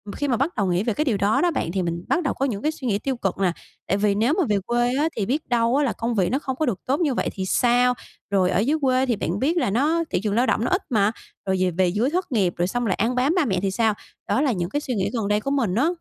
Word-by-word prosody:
khi 290 - -2
mà 245 -4 +1
bắt 285 +8 -1
đầu 200 - 0
nghĩ 180 +2 +1
về 230 - 0
cái 305 - -1
điều 235 -8 +1
đó 200 +2 +2
đó 350 -1 +2
bạn, 215 - -2
thì 190 +1 -1
mình 170 0 -3
bắt 355 - +1
đầu 280 - 0
có 270 - -1
những 215 -7 -3
cái 305 - +1
suy 290 -5 -6
nghĩ 205 -3 +1
tiêu 265 +2 -2
cực 195 -5 -2
nè, 190 -2 +2 0.4
tại 195 - +1
vì 205 0 +2
nếu 230 +8 +2
mà 365 - +3
về 205 -1 +2
quê 240 +2 +1
á 310 +2 +2
thì 210 - -1
biết 285 +8 -2
đâu 235 0 +2
á 290 - +3
là 260 - 0
công 230 0 -2
việc 185 -4 +2
nó 265 - 0
không 265 -3 -4
có 310 - 0
được 220 -8 -1
tốt 275 +4 0
như 305 -6 +1
vậy - - -1
thì 190 -2 -4
sao? 245 +4 +3 0.4
Rồi 185 -2 +3
ở 185 - +1
dưới 280 +9 +1
quê 260 -1 +2
thì 245 -3 0
bạn 190 -1 -2
biết 315 +8 +1
là 335 - +1
nó 300 +10 +1
thị - - 0
trường 210 -2 0
lao 245 +3 +3
động 225 - +1
nó - - 0
ít 375 +1 +2
mà, 210 -4 +2 0.4
rồi 190 0 +1
về 185 -1 +2
về 180 +2 +1
dưới 210 +9 +1
thất 355 0 -2
nghiệp 190 -7 +1
rồi 175 +1 +1
xong 245 +4 -2
lại 190 - +1
ăn 235 +4 0
bám 265 +7 +2
ba 360 -6 +2
mẹ 190 -6 0
thì 195 -1 0
sao? 220 +2 +2 0.4
Đó - - +2
là 285 -3 +2
những 175 -5 -2
cái 290 +6 -2
suy 255 -5 -3
nghĩ 190 - 0
gần 225 -4 -1
đây 210 0 +2
của 275 +6 -3
mình 235 -10 0
á. 260 +8 +3
235 Hz, 330 wpm, -23 LUFS, 200-275 Hz, 0.4 s, mà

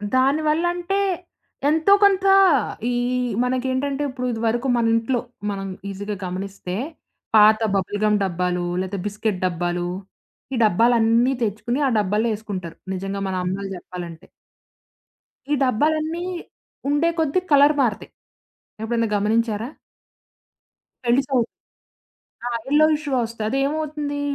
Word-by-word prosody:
దానివల్లంటే 315 +7 +1 0.7
ఎంతో 320 +6 +4
కొంత 395 -1 +4 0.7
ఈ - - 0 0.5
మనకేంటంటే 260 +3 -1
ఇప్పుడు 255 -1 -4
ఇదివరకు 230 +2 -1
మన 235 - +2
ఇంట్లో 230 +2 0 0.3
మనం 195 -1 -4 0.2
ఈజీగా 205 +2 -5
గమనిస్తే, 185 0 -5 0.6
పాత 215 +1 +7 0.2
బబుల్ 195 +2 -1
గమ్ 210 0 +3
డబ్బాలు, 180 -1 -1 0.2
లేతే 190 +1 -4
బిస్కెట్ 210 -2 -2
డబ్బాలు, 175 0 -1 0.7
ఈ - - 0
డబ్బాలన్నీ 230 +4 +3
తెచ్చుకొని 225 +5 -1
ఆ - - +2
డబ్బాల్లో 210 +3 +1
వేసుకుంటారు. 195 -6 -6 0.2
నిజంగా 195 +1 -4
మన 190 - -2
అమ్మలు 195 +2 -3
చెప్పాలంటే. 175 -1 -9 1.2
ఈ - - +4
డబ్బాలన్నీ 310 +7 0 0.6
ఉండే 295 +4 +2
కొద్దీ 320 +2 +2
కలర్ 285 +1 +6
మారతాయి. 225 -6 -1 0.7
ఎప్పుడైనా 230 0 0
గమనించారా? 220 +2 0 1.4
కనీసం 265 +3 +2 1.1
ఆ! - - +1 0.2
ఎల్లో 300 +2 +5
ఇష్‌గా 290 -4 -2
వస్తాయి. 225 -1 -4
అదేమవుతుంది? 290 +1 -1
230 Hz, 105 wpm, -22 LUFS, 200-285 Hz, 1.4 s, పాత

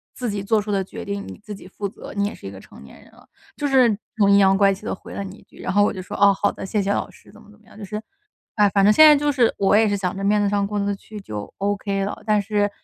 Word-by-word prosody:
自 250 - -4
己 205 -2 -3
做 215 +2 +2
出 205 0 -4
的 195 -1 0
决 - - -9
定 200 0 -4
你 - - -9
自 210 - -7
己 195 - -12
负 200 +2 -5
责， - - -11
你 200 0 0
也 205 - -3
是 - - -11
一 - - -7
个 95 - -11
成 - - -15
年 70 - -15
人 - - -21
了”， - - -21 0.3
就 290 - -2
是 255 -6 +4 0.2
很 200 -2 +4
阴 200 - +6
阳 195 -1 +4
怪 195 -1 +4
气 190 - -11
地 - - -3
回 - - -12
了 200 - -4
你 195 +1 -9
一 - - -19
句。 - - -20
然 - - -3
后 205 +1 +4
我 - - +1
就 185 - -6
说， 185 - -7
“哦， 200 -1 +5
好 205 - 0
的， - - -8
谢 205 +2 -1
谢 195 +1 -1
老 - - -1
师”， - - -20
怎 - - -17
么 210 - -18
怎 210 - -20
么 215 - -27
样。 - - -17
就 210 - -8
是， 210 +2 -5 0.5
唉， 210 -2 +4
反 200 -1 +3
正 210 - +6
现 310 +9 +8
在 300 - +8
就 295 0 +1
是， 250 -5 +2
我 195 0 +3
也 220 0 +4
是 205 - 0
想 190 -1 -3
着 195 - -5
面 205 +1 +2
子 205 - +1
上 200 -1 0
过 205 +1 -3
得 200 0 -1
去 210 +1 -11
就 105 - -7
OK 200 0 -1
了。 200 - -6
但 210 -2 +2
是， 205 0 0
205 Hz, 360 characters per minute, -22 LUFS, 195-210 Hz, 0.5 s, 现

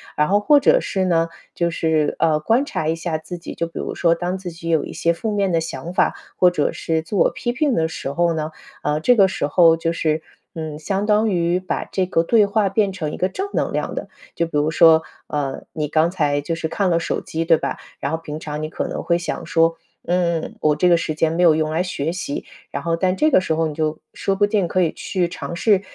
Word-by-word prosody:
然 150 +2 +2
后 205 +1 +4
或 285 +7 +5
者 - - +5
是 190 - -1
呢， 165 -2 +2 0.3
就 170 -1 0
是， 160 -2 0
呃， 155 -2 +3
观 225 - +2
察 160 - -3
一 160 - +1
下 165 -1 -2
自 165 +3 -8
己， 170 - -8
就 170 - -2
比 165 - -8
如 - - -3
说， 170 -1 +3
当 180 +2 -2
自 185 -1 -6
己 170 0 -7
有 160 -2 +2
一 - - -8
些 170 - +1
负 220 +7 -3
面 200 -2 +1
的 165 - +2
想 160 +1 -5
法， - - +2 0.2
或 180 - +6
者 165 -5 0
是 160 -1 -1
自 165 +6 -4
我 - - +5
批 240 - -2
评 275 +2 +1
的 160 -4 +1
时 140 -3 -5
候 170 +2 +2
呢， 155 -1 -2 0.3
啊， 150 +1 -1
这 245 +7 +4
个 195 -2 +6
时 190 - -2
候 165 +2 +5
就 165 0 -1
是， 160 -2 0 0.3
嗯， 155 -2 -5
相 195 +5 -1
当 210 +1 +3
于 175 -1 +1
把 185 - -3
这 190 - -1
个 165 -2 +1
对 215 +4 +4
话 200 0 +1
变 195 0 +1
成 160 -6 -3
一 - - -6
个 185 - +1
正 385 - -4
能 - - -1
量 - - -2
的。 - - -5 0.3
就 170 - +1
比 165 - -11
如 150 +2 +1
说， 160 -1 +6 0.2
呃， 140 -2 -3
你 150 -2 -2
刚 160 +2 +3
才 150 -6 +1
就 155 +3 -3
是 165 - -3
看 195 +1 0
了 170 - +3
手 170 - -2
机， 160 +1 -3
对 165 -1 +4
吧？ - - -3 0.2
然 140 - -2
后 - - +1
平 155 -2 -7
常 150 -1 -5
你 155 - -3
可 - - -3
能 - - -4
会 170 - +2
想 175 - -4
说： 165 0 +2 0.3
“嗯， 170 -2 0
我 150 -1 +3
这 180 - +2
个 175 - +6
时 160 - -2
间 160 +1 +1
没 170 - 0
有 165 -3 +6
用 155 0 0
来 160 +2 +1
学 165 -4 -2
习“。 175 -5 -4 0.3
然 - - -4
后 165 0 +1
但 185 +2 +1
这 310 +1 +3
个 185 - +5
时 165 - -1
候 165 +1 +1
你 155 - -5
就 155 0 -1 0.2
说 195 - -1
不 205 +1 +3
定 205 -3 +1
可 185 +2 +1
以 165 - +1
去 180 -3 -1
尝 170 - -6
试， 200 +1 +3
170 Hz, 275 characters per minute, -21 LUFS, 160-185 Hz, 0.3 s, 或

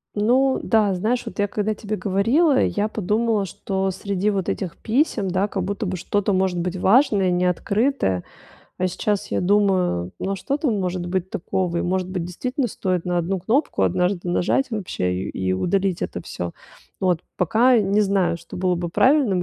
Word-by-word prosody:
Ну 255 +6 +3
да, 215 -4 +3
знаешь, 225 +7 0
вот - - -7
я 205 -1 +1
когда 210 +1 -1
тебе 215 0 -4
говорила, 235 - +2
я 210 +1 0
подумала, 215 0 0
что 190 +1 -2
среди 200 +2 -1
вот 195 -3 -2
этих 180 -4 -3
писем, 230 -4 0
да, 190 +3 +1
как 195 -3 -3
будто 200 +4 -3
бы 185 -1 -2
что-то 205 +3 0
может 185 -1 +1
быть 180 +1 -2
важное 200 -1 +4
и - - +1
не 180 +1 +1
открытое. 190 - 0 0.6
А 185 - +1
сейчас 200 +3 -2
я - - +1
думаю: 185 - +2
ну 195 +1 -2
что 275 +9 -2
там 255 -9 0
может 180 -1 -2
быть 185 0 -2
такого? 185 -2 -2
И - - 0
может 185 0 -1
быть, 185 -2 -3
действительно 250 +9 -2
стоит 185 -4 -2
на 180 -1 0
одну 180 +3 -1
кнопку 230 - 0
однажды 180 - 0
нажать 205 +10 +1
вообще 185 - -2
и 90 - -3 0.2
и - - +2
удалить 185 - 0
это - - -4
всё. 85 -1 -5 0.5
Вот. 180 -3 +1 0.2
Пока 235 +8 +4
не 205 0 +2
знаю, 195 -4 +1
что - - -11
было 180 0 +1
бы 175 0 -3
правильным 240 - +3
195 Hz, 185 wpm, -22 LUFS, 180-215 Hz, 0.6 s, важное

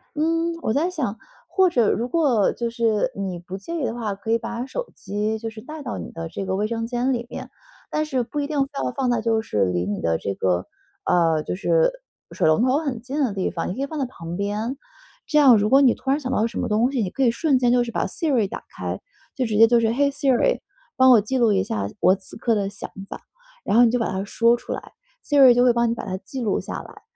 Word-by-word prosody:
嗯， 330 +2 0
我 220 - 0
在 320 +5 +1
想 260 - -3 0.3
或 375 -1 +3
者 240 -10 +2
如 235 - -1
果 255 - +2
就 235 0 -3
是 230 +1 0
你 190 -3 -4
不 180 +2 -7
介 265 - -7
意 - - 0
的 225 - -2
话， 225 -4 -3
可 220 +3 -5
以 230 - +4
把 235 +2 -5
手 - - -5
机 210 +3 -2
就 225 0 -4
是 220 0 -11
带 305 +4 -8
到 245 -4 -5
你 - - -7
的 165 0 -6
这 195 - -5
个 190 0 -1
卫 210 +2 0
生 230 0 -3
间 245 +2 0
里 235 -1 -3
面， - - -7 0.4
但 305 0 -1
是 260 -5 -1
不 275 +5 -5
一 285 - -1
定 295 -2 0
非 270 - -7
要 - - -1
放 265 -2 -1
在 235 - +1
就 225 0 +1
是 105 - 0
离 90 -1 -1
你 100 +2 -3
的 80 -1 +1
这 100 - -3
个， 90 -1 0 0.4
呃， 165 -3 +2
就 - - -3
是 - - +2 0.4
水 - - +1
龙 155 +7 +4
头 260 +2 +3
很 275 -7 -3
近 265 +5 -4
的 230 - 0
地 195 -2 -1
方， 165 - -4
你 - - -2
可 265 - -5
以 - - 0
放 305 +1 -6
在 270 - 0
旁 170 -7 -7
边。 210 +6 -2 0.5
这 300 - 0
样 265 -6 +7
如 210 +1 +1
果 270 +3 +6
你 255 -3 +5
突 265 - -6
然 275 +2 +2
想 260 -3 -4
到 220 - +2
什 - - -6
么 - - -1
东 225 +5 +2
西， 265 -4 0
你 195 - -1
可 270 - -5
以 235 - +4
瞬 275 +1 +1
间 245 -1 +3
就 245 0 +4
是 235 - -6
把 - - -1
Siri 265 -10 0
打 - - -7
开， - - -4 0.3
就 260 - 0
直 215 -3 -1
接 225 +1 +8
就 235 0 +4
是： 225 - +2
“嘿 280 +4 +2
，Siri 280 - +1 0.3
帮 260 0 +6
我 235 - +8
记 215 +6 -2
录 235 -3 +4
一 195 -2 +2
下 100 -1 -2
我 185 - +5
此 195 +2 -12
刻 230 -1 +1
的 200 -1 -1
想 200 0 -8 0.2
法。” - - -7 0.4
然 - - +1
后 240 - +8
你 235 - +4
就 245 - +1
把 230 - -1
它 190 +1 -2
说 230 +3 +3
出 - - -9
来 - - -6 0.3
，Siri 275 -4 +7
就 245 +1 +3
会 245 - +5
帮 235 0 +2
你 230 - +1
把 - - -6
它 185 - -3
记 255 +7 -7
录 215 -4 0
下 - - -6
来， - - -14
235 Hz, 310 characters per minute, -23 LUFS, 205-270 Hz, 0.5 s, 接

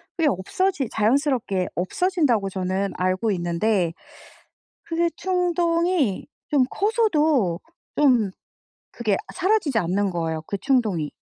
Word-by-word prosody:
그게 325 -3 +2
없어지 270 - -1
자연스럽게 230 -4 +1
없어진다고 240 - 0
저는 190 +1 -2
알고 185 +4 0
있는데 175 0 0 0.9
그게 335 +1 0
충동이 345 - 0 0.2
좀 275 -4 +3
커서도 310 - +1 0.3
좀 245 -9 +3 0.6
그게 215 -4 0 0.2
사라지지 370 - +1
않는 195 +2 0
거예요 160 -2 -3
그 200 - -3
충동이. 215 - 0
230 Hz, 250 characters per minute, -23 LUFS, -, 0.9 s, 좀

